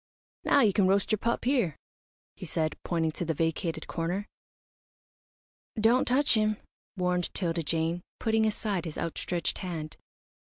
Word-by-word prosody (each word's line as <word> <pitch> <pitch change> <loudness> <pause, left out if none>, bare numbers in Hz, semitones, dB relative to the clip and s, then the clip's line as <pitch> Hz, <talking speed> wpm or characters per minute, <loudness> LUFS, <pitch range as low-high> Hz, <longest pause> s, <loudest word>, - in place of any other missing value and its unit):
"Now 280 - +5
you 210 -5 +4
can 195 -2 +4
roast 195 +3 +2
your 215 - +2
pup 235 +2 -1
here," 240 - +2 0.6
he - - -10
said, 155 -1 0
pointing 165 -2 0
to 165 - -4
the 165 -1 -1
vacated 165 +1 -1
corner. 175 +4 -2 1.5
"Don't 230 +4 +4
touch 280 +4 +4
him," 215 -1 +2 0.4
warned 180 -1 0
'Tilda 170 -3 0
Jane, 165 +2 0 0.2
putting 220 -1 +2
aside 205 -4 -1
his 160 - -5
outstretched 170 +1 -1
hand. 165 -5 -5
180 Hz, 140 wpm, -29 LUFS, 165-215 Hz, 1.5 s, Now